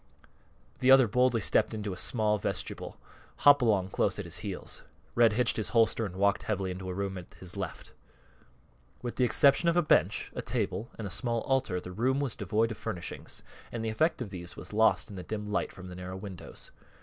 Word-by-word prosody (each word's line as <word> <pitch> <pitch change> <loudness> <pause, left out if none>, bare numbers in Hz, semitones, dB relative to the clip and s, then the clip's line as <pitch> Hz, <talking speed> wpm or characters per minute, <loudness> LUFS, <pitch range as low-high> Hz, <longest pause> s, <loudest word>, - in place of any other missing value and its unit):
The 130 - +2
other 135 -2 +8
boldly 125 +1 +2
stepped 110 - +2
into 105 -2 -3
a - - -6
small 105 +2 +1
vestibule, - - -4 0.5
Hopalong 115 -10 +6
close - - +1
at - - -4
his - - -4
heels. - - -6 0.3
Red 115 -2 +5
hitched 120 +1 +2
his 110 - -2
holster 115 -1 +3
and 90 - -10
walked 100 +1 +2
heavily 95 -3 -2
into 95 +1 -6
a - - -3
room 95 -1 -3
at 90 - -14
his 90 0 -8
left. 95 -4 -6 1.1
With 120 - -4
the 125 - +3
exception 140 +6 +5
of 170 - +1
a 175 - +4
bench, 100 - +2
a - - -3
table, 115 - -2
and 110 - -5
a 95 - -5
small 115 +4 -1
altar, 130 -9 0
the 90 - -8
room 130 +8 +1
was 140 -6 -1
devoid 110 +3 0
of 110 - -7
furnishings, 85 - -6 0.3
and 115 -1 -4
the - - 0
effect 130 +4 +1
of 105 - -9
these 85 -2 -7
was 90 +2 -9
lost 110 0 +3
in 100 - -8
the - - -5
dim 105 +1 -4
light 105 - -1
from 95 0 -10
the 90 - -8
narrow 90 +1 -6
windows. 95 -2 -8
105 Hz, 210 wpm, -30 LUFS, 95-120 Hz, 1.1 s, other